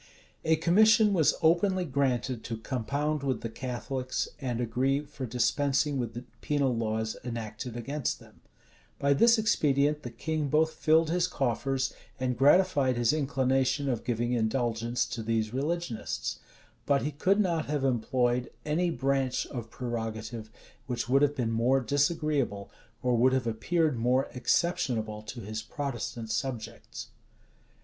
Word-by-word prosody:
A 160 0 +4
commission 210 +6 +5
was 160 -6 +3
openly 180 +3 +3
granted 130 -4 -1
to 115 - -4
compound 140 +6 -2
with 130 -4 -1
the 115 - -5
Catholics, 130 +1 -3
and 125 -3 -2
agree 130 +4 +1
for 140 -3 -7
dispensing 140 +4 +1
with 120 -2 -3
the 120 - -5 0.2
penal 140 -4 +1
laws 110 -1 -1
enacted 115 0 -5
against 140 +3 -2
them.[*] - - -18 0.6
By 140 0 +3
this 230 - +5
expedient, 150 -8 +2
the 120 - -6
king 155 +5 -2
both 160 +2 +2
filled 160 +1 +3
his 180 0 +2
coffers, 135 -2 -1 0.3
and 125 -1 0
gratified 140 -1 +4
his 120 +1 +3
inclination 135 -1 +1
of 125 -4 -1
giving 120 0 -1
indulgence 115 0 0
to 115 - -5
these 110 0 -1
religionists; 145 -3 -3 0.5
but 140 -1 +3
he 150 - -1
could 185 +8 +2
not 170 -6 +1
have 145 -1 -1
employed 125 0 +1 0.2
any 165 +4 +1
branch 135 -4 0
of 120 -4 -7
prerogative 110 -2 -5 0.4
which 125 -2 -2
would 135 +2 +4
have 145 0 +3
been 120 -5 -1
more 120 +4 +3
disagreeable, 140 -4 0 0.3
or 125 -1 +2
would 130 +3 +4
have 130 -2 +1
appeared 140 +5 0
more 125 +3 +2
exceptionable 125 -7 0
to 115 +3 -8
his 110 +2 -5
Protestant 120 -3 -5
subjects. 120 0 -5
130 Hz, 140 wpm, -29 LUFS, 120-150 Hz, 0.6 s, commission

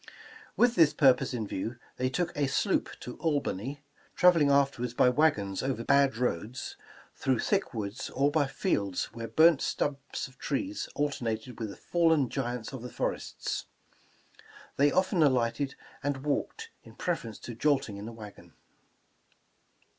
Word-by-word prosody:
With 245 -1 +5
this 165 -7 +5
purpose 135 -4 +4
in 120 -4 -2
view, 105 +4 -4 0.2
they 130 0 0
took 175 +6 -2
a 145 -1 +1
sloop 140 - +1
to 125 - -7
Albany, 145 - -2 0.3
traveling 170 -5 +5
afterward 135 -4 +1
by 125 - +6
wagons 120 -9 +2
over 130 -3 -2
bad 140 -2 +3
roads, 120 0 -2 0.4
through 130 -2 0
thick 200 - 0
woods, 105 +2 -4
or 140 +2 +1
by 145 -2 +2
fields 100 - -1
where 115 -1 -5
burnt 160 +1 +5
stumps 140 -1 -2
of 130 -1 -20
trees 300 +1 -2
alternated 120 -5 -2
with 110 -2 -3
the 100 - -9
fallen 160 -6 +2
giants 125 -2 -3
of 130 - -6
the 125 - -6
forests. - - -3 1.1
They 145 +1 +4
often 185 0 +2
alighted 130 -1 +2 0.3
and 140 -1 -2
walked 445 - -2
in - - -15
preference 115 - -3
to 120 - -8
jolting 135 -4 +1
in 100 +2 -7
the - - -6
wagon. 105 -3 -12
135 Hz, 145 wpm, -29 LUFS, 115-145 Hz, 1.1 s, by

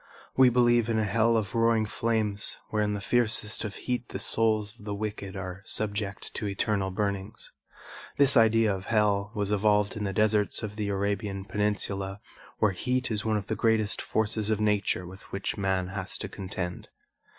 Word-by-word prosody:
We 130 -1 +7
believe 120 -1 +3
in 115 - +1
a 110 - +2
hell 115 +2 +3
of 100 -3 -2
roaring 115 -1 +3
flames 110 -2 -1
where 110 - +1
in 105 0 0
the 100 - -4
fiercest 110 -2 +2
of 105 -3 -5
heat 125 -1 -3
the - - -4
souls 110 0 +1
of - - -14
the 105 -1 -3
wicked 105 -2 -5
are 95 0 -6
subject 100 -1 -3
to 105 - -3
eternal 100 -1 0
burnings. 100 +2 -3 0.7
This 140 -1 +5
idea 115 -3 +5
of 95 0 -8
hell 105 -2 +2
was 105 -1 -1
evolved 105 0 +2
in 105 - -3
the 100 - -1
deserts 105 +2 +1
of 105 -1 -5
the 105 -1 -2
Arabian 100 0 -2
Peninsula 100 -2 -2 0.4
where 105 - +3
heat 125 +7 -1
is 105 -2 -1
one 110 -1 +1
of 100 - -4
the - - -2
greatest 110 -2 +2
forces 110 0 0
of 110 -1 +1
nature 105 -3 +1
with 95 +2 -11
which 100 0 -3
man 95 -2 0
has 95 -1 -4
to - - -4
contend. 90 -2 -5
105 Hz, 185 wpm, -28 LUFS, 100-110 Hz, 0.7 s, We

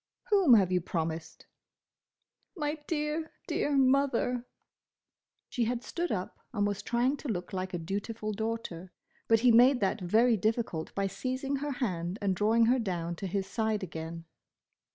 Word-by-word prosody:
"Whom 375 - +7
have 190 -4 +3
you 180 -1 +2
promised?" 165 -1 -4 1.1
"My 300 0 -2
dear, 310 0 -2
dear 285 -1 0
Mother." 255 -2 +2 1.0
She 240 - -1
had 240 +1 -2
stood 345 0 -3
up 185 -2 -3
and 205 -3 +1
was 205 -1 -1
trying 245 +4 +1
to 295 - -7
look 180 -6 -3
like 185 0 -3
a - - 0
dutiful 205 +5 -4
daughter. 220 -5 -4 0.4
But 225 -1 +4
he 250 0 +6
made 245 +3 +6
that 195 +1 0
very 225 +6 +4
difficult 215 -6 -1
by 195 - 0
seizing 260 +7 -2
her 290 +1 -3
hand 185 -7 -2
and 195 -2 0
drawing 225 +4 +3
her 250 +3 +3
down 175 -6 -2
to 195 - -4
his 195 +1 -1
side 220 +1 -1
again. 165 -1 -6
220 Hz, 155 wpm, -30 LUFS, 185-255 Hz, 1.1 s, Whom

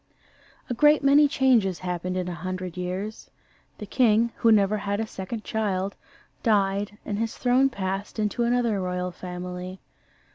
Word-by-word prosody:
A - - -2
great 295 +4 +4
many 285 +2 +6
changes 240 -10 +2
happen 180 +1 -2
in 180 -1 -2
a 180 - -3
hundred 185 +1 -5
years. 185 +4 -5 0.5
The 210 - -7
king, 230 0 +3
who 230 - +4
never 210 -1 +4
had 200 0 -2
a 225 - -1
second 215 +2 -6
child, 200 -3 -2 0.5
died, 205 -2 +1
and 205 0 -3
his 225 0 -2
throne 255 +2 +3
passed 195 -3 -4
into 215 +2 -1
another 235 -4 +1
royal 180 0 -2
family. 180 +1 -7
200 Hz, 150 wpm, -25 LUFS, 185-230 Hz, 0.5 s, many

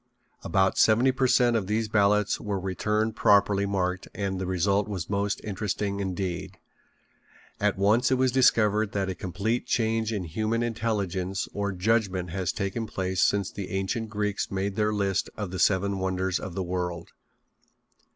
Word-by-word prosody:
About 95 +2 +1
seventy 120 +4 +5
per 130 0 +1
cent 120 -1 +4
of 105 -5 0
these 110 +2 0
ballots 105 -1 +2
were 100 -2 -2
returned 105 +4 -1
properly 100 -1 +3
marked 95 -2 -1
and 95 -1 -2
the 95 - -2
result 100 +3 +1
was 95 -4 -5
most 100 0 0
interesting 100 0 -2
indeed. 95 -2 -3 1.0
At 105 -1 +1
once 110 +6 +3
it 130 - +3
was 130 0 +2
discovered 110 -5 +3
that 95 -1 -1
a - - -3
complete 100 +6 -2
change 115 -1 0
in 105 -4 -2
human 110 +7 -1
intelligence 100 -5 -2
or 100 0 -1
judgment 95 -2 0
has 95 -1 -1
taken 100 +4 -3
place 95 -2 -2
since 100 -1 +2
the 100 -2 -6
ancient 95 +4 -2
Greeks 105 -2 -2
made 95 0 -2
their 105 0 +1
list 100 -2 0
of 105 -4 -4
the 95 - -4
seven 100 0 +2
wonders 95 0 -1
of 95 -3 -7
the 95 - -1
world. 90 -1 -3
100 Hz, 160 wpm, -27 LUFS, 95-110 Hz, 1.0 s, seventy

